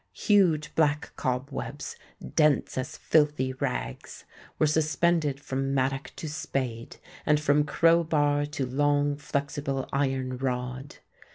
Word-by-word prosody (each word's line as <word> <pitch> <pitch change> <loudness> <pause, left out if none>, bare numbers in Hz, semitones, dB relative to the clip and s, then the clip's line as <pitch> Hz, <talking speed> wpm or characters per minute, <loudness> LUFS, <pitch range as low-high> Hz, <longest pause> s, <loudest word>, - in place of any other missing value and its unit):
Huge 165 -8 +2
black 150 -1 +1
cob 130 +2 -2
webs, 135 +2 -5 0.4
dense 150 -2 +3
as 130 0 -4
filthy 150 -4 +2
rags, 60 - -4 0.3
were - - +3
suspended 155 -1 +1
from 135 0 -2
mattock 135 +1 -1
to 160 - -6
spade, 130 -6 -4 0.3
and 150 -1 +3
from 150 0 +3
crow 165 +2 +4
bar 145 -2 +1
to 145 -2 -3
long 145 +2 +1
flexible 140 -1 -3
iron 130 -2 0
rod. 125 +1 -3
145 Hz, 120 wpm, -27 LUFS, 130-150 Hz, 0.4 s, crow